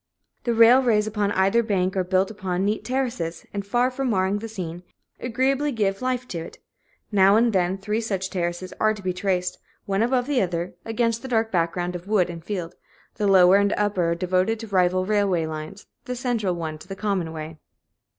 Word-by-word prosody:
The 235 -1 +1
railways 230 -2 +5
upon 210 -1 -1
either 195 +5 +3
bank 190 -4 0
are 190 - +1
built 190 +3 -1
on 185 0 0
neat 210 +2 -1
terraces, 245 -11 -3
and, 200 -1 -3
far 240 +5 +1
from 265 0 -2
marring 195 -1 +1
the 225 - -6
scene, 175 -5 -6 0.4
agreeably 265 +4 0
give 200 -4 -1
life 255 -1 -1
to 170 - -4
it; 165 - -9 0.5
now 195 0 +5
and 230 0 +3
then, 185 0 +1
three 210 +3 -2
such 195 -4 -3
terraces 175 0 -3
are 215 0 +3
to 205 - -11
be 185 -1 -1
traced, 180 -1 -1 0.3
one 195 0 0
above 245 +1 +2
the 275 -2 +1
other, 175 -1 -2
against 230 0 0
the 265 - -7
dark 225 -3 0
background 175 0 -1
of 175 +2 -7
wood 195 -5 +2
and 165 -1 -9
field 175 -3 -4 0.4
the 210 -2 +1
lower 190 -1 +7
and 200 0 +2
upper 185 -5 +1
devoted 185 +5 0
to 225 - -7
rival 185 -1 +2
railway 200 -5 +1
lines, 160 +6 -7 0.2
the 250 - -4
central 235 -7 -1
one 160 -2 -5
to - - -14
the 195 - -6
common 195 -5 -1
way. 155 0 -7
195 Hz, 195 wpm, -24 LUFS, 180-225 Hz, 0.5 s, lower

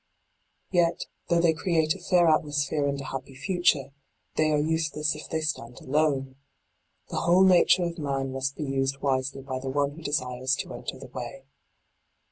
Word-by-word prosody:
Yet, 175 -2 +2 0.2
though 170 - +4
they 170 -1 +4
create 160 -2 +1
a 195 - -10
fair 175 -1 +3
atmosphere 145 -2 +1
and 140 0 -1
a - - -5
happy 135 0 -6
future, 175 -3 +1 0.4
they 155 0 +2
are 150 - +3
useless 155 -1 0
if 150 - -9
they 160 - -1
stand 130 -6 -3
alone. 135 -2 0 0.7
The - - -4
whole 175 +3 +5
nature 185 0 +5
of 170 0 -3
man 135 -2 -2
must 135 +1 -2
be - - -4
used 135 -1 -1
wisely 135 0 -1
by 130 -1 -4
the 135 +1 -5
one 140 +1 +1
who 160 +3 -11
desires 130 -3 0
to - - -9
enter - - -6
the - - -11
way. - - -7
145 Hz, 175 wpm, -27 LUFS, 135-165 Hz, 0.7 s, whole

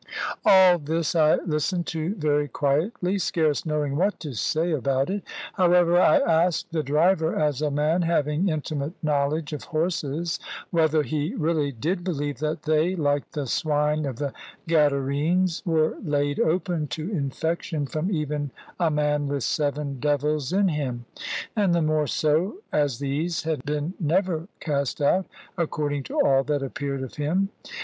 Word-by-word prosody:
All 185 -2 +7
this 160 +1 -1
I 155 -2 +5
listened 170 +2 -1
to 165 +5 -2
very 150 -3 +1
quietly, 175 - 0
scarce 160 -3 0
knowing 150 -2 -1
what 195 +7 +1
to 150 -5 -5
say 160 - 0
about 135 +1 0
it. 200 +1 -2 0.3
However, 175 -1 +4
I 305 - +6
asked 170 - +2
the 165 -1 0
driver, 160 +4 +2
as 150 -2 0
a 150 - +1
man 150 +5 +1
having 165 +1 +1
intimate 155 -1 -3
knowledge 150 +1 0
of 150 - -5
horses, 160 0 -1 0.3
whether 160 -2 +3
he 150 - -2
really 155 - 0
did 165 - -2
believe 145 -6 -3
that 155 +1 -2
they 155 +4 +2
(like 145 -4 0
the 145 -2 -2
swine 150 +3 0
of 130 - -4
the 140 +2 -3 0.3
Gadarenes) 150 +3 +2
were 160 -2 +2
laid 145 -1 0
open 170 -2 0
to 160 +6 -4
infection 160 0 -2
from 155 +6 -2
even 150 -4 -2 0.3
a 170 -2 +3
man 150 -1 +1
with 140 -2 -2
seven 145 -2 -1
devils 145 0 0
in 195 +1 +3
him; 130 -6 -3 0.5
and 200 -5 +2
the 170 - +2
more 155 -1 +1
so 155 +8 +1 0.2
as 145 -5 +1
these 145 +5 -2
had 155 -5 -2
been 150 +3 -2
never 170 0 0
cast 140 -3 -1
out, 180 +6 +2 0.3
according 150 -3 -1
to - - -7
all 135 -1 +4
that 145 -2 0
appeared 135 0 -3
of 130 - -8
him. 175 +7 0
155 Hz, 155 wpm, -25 LUFS, 145-170 Hz, 0.5 s, All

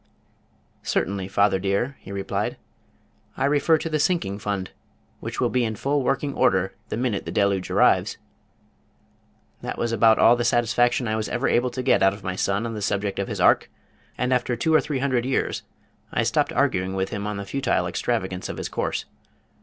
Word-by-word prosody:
"Certainly, 95 0 -1
father 95 0 +2
dear," 100 +8 -1
he 95 - -11
replied. 100 -1 -2 0.8
"I - - +1
refer 145 +3 +3
to 160 - -4
the 155 -1 -1
Sinking 145 - 0
Fund 100 -3 -3 0.5
which - - -6
will - - +1
be 125 -1 +2
in 110 -1 -2
full 140 +6 0
working 135 +2 0
order 95 +1 +2 0.2
the - - -3
minute 120 -4 -1
the - - -5
deluge 100 -2 +1
arrives." - - +3 1.4
This - - -4
was 120 - -1
about 115 0 +5
all 120 - +6
the 120 - -1
satisfaction 120 +1 +2
I 110 - 0
was 110 -1 -2
ever 125 +2 0
able 125 +1 +2
to 125 +1 -5
get - - +3
out 95 +1 +4
of 100 - -14
my 95 0 -3
son 100 +4 0
on 115 - -4
the 105 - -5
subject 100 -1 -1
of 100 - -1
his - - -4
Ark, - - +4 0.5
and 125 +1 +1
after 125 -1 0
two 160 +8 0
or 155 - +6
three 145 - -3
hundred 130 -3 0
years 135 +1 -1 0.5
I - - +1
stopped - - +1
arguing 95 +1 0
with 95 0 -1
him 100 -1 -4
on 105 -1 -3
the 100 - -5
futile 125 -5 0
extravagance 95 0 -2
of - - -5
his - - -4
course. - - -2
110 Hz, 195 wpm, -24 LUFS, 100-125 Hz, 1.4 s, all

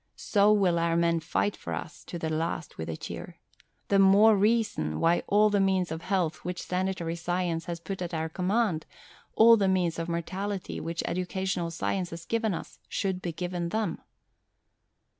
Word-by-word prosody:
So 205 0 +3
will 190 -5 +3
our 165 0 +1
men 170 0 +2
fight 195 +5 -1
for - - -5
us 155 - -8
to 175 - -6
the 160 -1 -3
last 160 - -3
with 80 +1 -4
a 80 - -4
cheer. - - -7 0.5
The 200 - +4
more 200 +3 +7
reason 205 - +1
why 170 +1 +3
all 210 +1 +4
the 205 - +2
means 190 -3 +1
of 160 0 -4
health 175 -4 0
which 180 0 -4
Sanitary 180 -2 -2
Science 170 -1 -2
has 170 -1 -4
put 190 +2 -6
at 175 - -3
our 160 -1 -2
command, 180 0 0 0.5
all 230 +1 +8
the 200 -2 +2
means 180 -3 +1
of 165 +1 -3
morality 190 +4 -3
which 165 +1 -3
Educational 180 0 -2
Science 175 +2 -2
has 165 0 -8
given 225 -4 0
us, - - -9
should 190 -2 -2
be 175 - -3
given 175 +1 -3
them." 220 +3 -2
180 Hz, 180 wpm, -28 LUFS, 170-195 Hz, 0.5 s, all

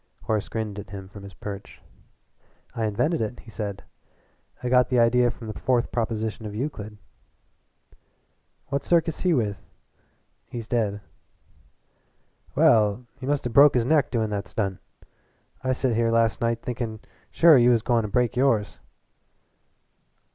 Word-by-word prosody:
Horace 110 -2 -1
grinned 105 -2 -4
at 100 - -9
him 100 -1 -8
from 100 +1 -12
his 100 -2 -11
perch. 100 +4 -8 0.9
"I 115 - -2
invented 125 +10 0
it," 110 +2 -4
he 115 - -14
said. 100 -2 -5 0.8
"I - - -1
got 125 -1 +4
the 125 - +1
idea 120 +1 +4
from 115 - -9
the 110 - -5
fourth 125 -2 +1
proposition 110 -2 -2
of 105 - -7
Euclid." 110 -5 -5 1.7
"What 140 0 -1
circus 165 -2 +1
he 180 -3 +2
with?" 105 -6 -2 0.8
"He's 115 -3 -7
dead." 105 -4 -1 1.5
"Well, 105 +2 +4
he 130 - -6
must 145 -2 0
of 120 - -3
broke 140 +2 +7
his 120 -2 +2
neck 150 +1 +3
doin' 110 -3 -1
that 100 -1 -3
stunt. 100 -4 -3 0.8
I 130 - 0
set 130 -2 0
here 115 0 +2
last 115 -1 +2
night 115 0 0
thinkin' 115 -3 -4 0.3
sure 165 -2 +6
you 120 -2 +5
was 115 -3 +3
goin' 120 -2 +2
to 105 - -4
break 120 +3 0
yours." 120 -6 +1
115 Hz, 150 wpm, -25 LUFS, 105-125 Hz, 1.7 s, broke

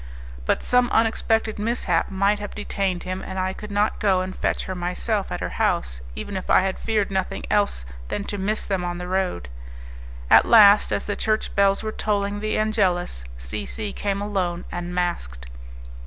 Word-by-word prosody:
But - - +1
some 250 -1 +3
unexpected 225 -1 +1
mishap 210 -6 0
might 200 +2 +1
have 205 -1 -7
detained 195 -3 -2
him, 185 +1 -4
and 190 - -6
I 185 0 -1
could 210 - -9
not 205 +1 0
go 190 -3 +3
and 185 0 -5
fetch - - -1
her 185 - -4
myself 185 +4 -2
at - - -4
her - - -2
house, - - 0
even 200 - -6
if 185 - -5
I - - +6
had 190 0 -2
feared 215 -3 0
nothing 190 -1 -2
else 200 - +1 0.2
than 200 - -3
to 205 0 -4
miss 210 +3 -1
them 190 -3 -1
on 175 0 -3
the 180 0 -6
road. 185 - -1 0.8
At - - +6
last, 210 -2 +7
as - - -1
the 205 - -2
church 215 -1 -1
bells 200 0 +3
were 215 - -2
tolling 205 -1 -1
the 215 +1 -1
Angelus, 185 - 0
C - - -4
C 210 -2 -4
came 200 0 -2
alone, 185 -4 -2
and 175 0 -5
masked. 60 - -2
195 Hz, 185 wpm, -23 LUFS, 180-210 Hz, 0.8 s, last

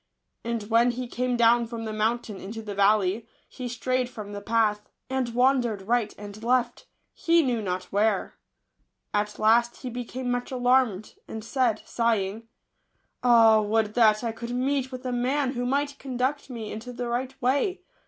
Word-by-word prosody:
And 230 -2 -2
when 230 +3 +3
he 245 +1 -3
came 250 0 -1
down 235 0 +4
from 225 -1 -6
the 215 - -4
mountain 220 0 -1
into 220 +3 -7
the 210 -1 -5
valley, 200 +2 +2 0.2
he 255 -2 -7
strayed 250 +1 -1
from 210 -4 -8
the 205 - -6
path, 210 -1 +1 0.2
and 260 -2 0
wandered 245 -5 +2
right 230 0 +1
and 205 +1 -10
left, 245 0 0 0.3
he 335 0 +3
knew 245 -4 0
not 185 -2 -2
where. 205 0 +1 0.8
At 210 0 -1
last 235 +2 +3
he 250 - -4
became 245 +1 -4
much 245 0 -2
alarmed, 245 -5 +1
and 220 -1 -7
said, 235 -3 0
sighing: 225 -2 -1 0.4
" - - -47
Ah, 225 -3 +6
would 215 0 0
that 220 -2 +4
I 230 - -1
could 235 +1 -7
meet 265 +1 0
with 255 0 -8
a 250 - -1
man 255 +3 0
who 245 -1 -2
might 280 +1 -1
conduct 265 +2 -2
me 230 -4 -6
into 230 +3 -7
the 245 0 -4
right 255 +2 -3
way 285 - +1
235 Hz, 175 wpm, -26 LUFS, 215-250 Hz, 0.8 s, Ah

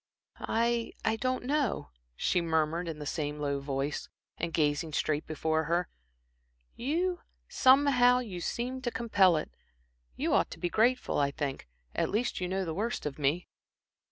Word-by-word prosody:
"I 235 0 0
I 220 0 +2
don't 255 +2 -1
know," 280 - 0 0.2
she 180 - +1
murmured, 165 +1 0
in 160 -2 -4
the 150 - -6
same 150 0 -2
low 140 -1 -1
voice, 140 +1 -3 0.3
and 170 0 -2
gazing 150 0 0
straight 150 +1 0
before 160 0 0
her. 170 +3 0 0.9
"You 345 +8 0 0.3
somehow 260 -2 +5
you 205 -8 -4
seem 250 +7 -3
to 245 - -1
compel 200 -8 +3
it. 155 - -4 0.6
You - - 0
ought - - +3
to - - -9
be 175 - -1
grateful, 245 0 +2
I 140 -1 +3
think. 140 - -4 0.3
At - - 0
least 220 -1 -1
you 180 - 0
know 190 +1 -1
the 165 - -3
worst 220 +7 -2
of 150 0 -4
me." 150 +5 +1
180 Hz, 160 wpm, -30 LUFS, 150-240 Hz, 0.9 s, somehow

